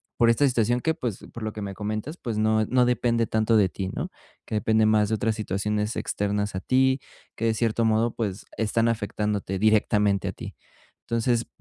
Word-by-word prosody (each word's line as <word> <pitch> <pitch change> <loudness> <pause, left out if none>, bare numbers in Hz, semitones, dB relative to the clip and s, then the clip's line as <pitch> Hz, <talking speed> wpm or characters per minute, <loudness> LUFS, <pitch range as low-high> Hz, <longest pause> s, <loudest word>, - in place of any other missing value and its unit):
por 115 - +4
esta 140 +5 +4
situación 120 -1 +1
que, 160 +6 0
pues, 125 - -5
por 115 - -8
lo 110 - -2
que 105 - -6
me 100 -1 -5
comentas, 110 - -4
pues, 115 -9 -4
no 110 0 +2
no 125 -1 +3
depende 120 -1 +1
tanto 110 +1 +2
de 100 -3 +4
ti, 95 +1 -4
¿no?, - - -4 0.4
que - - -8
depende 110 +1 +3
más 105 -1 +3
de 110 - +1
otras 110 +1 0
situaciones 105 +1 -2
externas 105 0 -1
a - - -1
ti, 130 +4 +2 0.3
que - - -6
de 115 - +3
cierto 115 0 +1
modo, 110 +1 +2
pues, 100 -4 -4
están 115 +1 +1
afectándote 105 -3 -1
directamente 105 -1 +2
a - - -2
ti. - - -9 0.5
Entonces, 115 0 0
110 Hz, 195 wpm, -25 LUFS, 105-115 Hz, 0.5 s, por